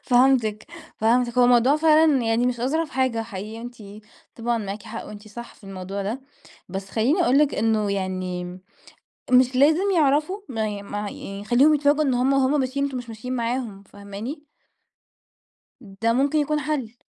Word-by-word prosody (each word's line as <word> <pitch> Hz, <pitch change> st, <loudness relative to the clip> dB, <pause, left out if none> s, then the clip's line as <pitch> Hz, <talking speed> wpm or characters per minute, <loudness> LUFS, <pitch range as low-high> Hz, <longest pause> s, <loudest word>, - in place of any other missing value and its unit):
فهمتِك، 245 Hz, -4 st, +2 dB, 0.3 s
فهمتِك، 240 Hz, +2 st, +1 dB
هو 250 Hz, -, +6 dB
الموضوع 245 Hz, +3 st, +4 dB
فعلًا 310 Hz, -2 st, +4 dB
يعني 230 Hz, +1 st, +1 dB
مش 245 Hz, -2 st, -2 dB
أظرف 305 Hz, +5 st, -1 dB
حاجة 255 Hz, -3 st, 0 dB
حقيقة، 215 Hz, +1 st, -7 dB
أنتِ 245 Hz, 0 st, -9 dB, 0.6 s
طبعًا 235 Hz, 0 st, -1 dB
معاكِ 205 Hz, -1 st, -5 dB
حق 225 Hz, 0 st, -7 dB
وأنتِ 210 Hz, 0 st, -11 dB
صح 235 Hz, +3 st, -10 dB
في -, -, -20 dB
الموضوع 195 Hz, +1 st, -6 dB
ده، 220 Hz, +7 st, -3 dB, 0.5 s
بس 195 Hz, +1 st, -6 dB
خليني 270 Hz, -, +2 dB
أقول 275 Hz, -4 st, +3 dB
لك 295 Hz, -1 st, +3 dB
إنه 215 Hz, -2 st, +1 dB
يعني 185 Hz, -2 st, -3 dB, 0.9 s
مش 255 Hz, 0 st, +5 dB
لازم 315 Hz, +9 st, +4 dB
يعرفوا، 310 Hz, +6 st, +2 dB
ما 220 Hz, -4 st, -2 dB
ي 205 Hz, -1 st, -5 dB
ما 205 Hz, +1 st, -6 dB
يعني 200 Hz, -1 st, -6 dB
خليهم 270 Hz, +8 st, +4 dB
يتفاجؤوا 290 Hz, +1 st, +2 dB
إن 265 Hz, -3 st, +1 dB
هم، 255 Hz, +2 st, +2 dB
وهم 275 Hz, +2 st, +2 dB
ماشيين 270 Hz, +2 st, -1 dB
أنتم 275 Hz, -2 st, -3 dB
مش 245 Hz, -, -9 dB
ماشيين 240 Hz, +3 st, -5 dB
معاهم، 230 Hz, -4 st, -3 dB
فاهماني؟ 205 Hz, +9 st, -8 dB, 1.4 s
ده 220 Hz, +2 st, -2 dB
ممكن 280 Hz, +5 st, +2 dB
يكون 300 Hz, +1 st, 0 dB
حل. 265 Hz, -6 st, -3 dB
240 Hz, 165 wpm, -23 LUFS, 210-275 Hz, 1.4 s, هو